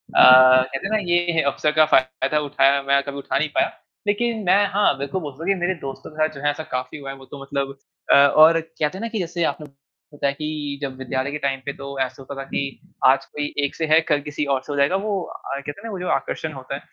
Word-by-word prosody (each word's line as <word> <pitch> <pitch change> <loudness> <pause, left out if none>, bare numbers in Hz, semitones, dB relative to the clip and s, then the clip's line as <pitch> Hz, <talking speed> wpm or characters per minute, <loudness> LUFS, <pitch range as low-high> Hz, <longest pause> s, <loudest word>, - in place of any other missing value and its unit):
अ, - - +7
कहते 130 +3 +7
हैं - - -7
ना 215 - +3
ये 175 - +5
है 160 - +2
अवसर 150 - 0
का 155 0 +5
फ़ायदा 130 -2 +2
कल 150 - 0
उठाया 140 0 +3
मैं 140 0 +3
कभी 140 0 -6
उठा 140 - -2
नहीं 155 0 0
पाया। - - +3 0.4
लेकिन 230 +2 0
मैं 200 +3 +4
हाँ, 205 -9 +3
बिल्कुल 140 +7 -3
बोलता 145 0 -8
हूँ - - -5
कि 195 - +3
मेरे 175 +2 0
दोस्तों 135 +2 -7
के 155 - -17
साथ 155 0 +1
जो 140 - -9
है 145 - +4
ऐसा 155 +2 -6
काफ़ी 130 +3 -4
हुआ 140 -2 -8
है, 135 - -6
वो 135 - -14
तो 140 0 -11
मतलब 140 0 -3 0.4
अ, - - +8
और 155 +4 +6
कहते 160 +1 -3
हैं 195 - -7
ना 230 - -2
कि 220 -2 -3
जैसे 170 -1 -2
आपन 150 - -11 0.5
होता 140 -1 -1
है 140 - 0
कि 150 -1 -5
जब 135 -2 -5
विद्यालय 130 +1 -3
के 150 - -3
टाइम 140 -2 -2
पे 140 - -3
तो 140 0 -7
ऐसा 130 0 -3
होता 135 +1 -8
था - - -5
कि - - -2 0.4
आज 135 +1 +4
कोई 145 0 -5
एक - - -5
से 160 - -1
है, 155 +1 +6
कल 150 -2 0
किसी 145 +1 -4
और 130 - -3
से - - -8
हो 145 - -3
जाएगा। 140 +7 +3
वो 200 -1 -1
अ, 140 - -7
कहते 140 +1 -6
हैं - - -18
ना 225 - -5
वो 190 - -5
जो 180 - -4
आकर्षण 155 -1 -5
होता 135 0 -6
है, 140 - -6
145 Hz, 275 wpm, -22 LUFS, 135-160 Hz, 0.5 s, अ